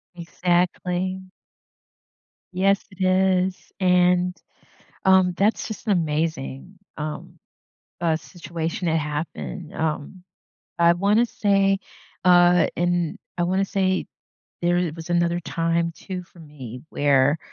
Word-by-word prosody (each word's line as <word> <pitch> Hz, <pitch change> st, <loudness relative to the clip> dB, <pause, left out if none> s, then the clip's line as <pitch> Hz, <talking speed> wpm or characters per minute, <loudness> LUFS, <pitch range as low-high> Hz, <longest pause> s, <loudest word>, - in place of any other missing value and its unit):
Exactly. 180 Hz, +2 st, -1 dB, 1.3 s
Yes, 195 Hz, +2 st, +2 dB
it 190 Hz, 0 st, -5 dB
is. 185 Hz, 0 st, +1 dB
And, 180 Hz, 0 st, +3 dB, 0.7 s
um, 190 Hz, -1 st, +5 dB
that's 210 Hz, +3 st, +1 dB
just 220 Hz, +1 st, -8 dB
an 205 Hz, -, +4 dB
amazing, 160 Hz, +1 st, -2 dB, 0.2 s
um, 150 Hz, 0 st, -6 dB, 0.6 s
uh, 165 Hz, -2 st, +2 dB
situation 170 Hz, +2 st, -5 dB
that 160 Hz, -, +2 dB
happened, 150 Hz, -, -5 dB
um, 160 Hz, +3 st, -3 dB, 0.6 s
I 170 Hz, 0 st, +6 dB
wanna 205 Hz, +6 st, +3 dB
say, 195 Hz, -2 st, +2 dB, 0.5 s
uh, 175 Hz, -1 st, +6 dB
and 175 Hz, -1 st, 0 dB, 0.2 s
I 175 Hz, -, +2 dB
wanna 190 Hz, +2 st, +1 dB
say 190 Hz, -1 st, 0 dB, 0.6 s
there 175 Hz, -1 st, +2 dB
was 165 Hz, +1 st, -9 dB
another 170 Hz, 0 st, +1 dB
time 165 Hz, 0 st, -1 dB
too 185 Hz, +1 st, -7 dB
for 175 Hz, -, -21 dB
me 130 Hz, -6 st, -10 dB
where, 145 Hz, +1 st, +3 dB
175 Hz, 110 wpm, -23 LUFS, 165-185 Hz, 1.3 s, I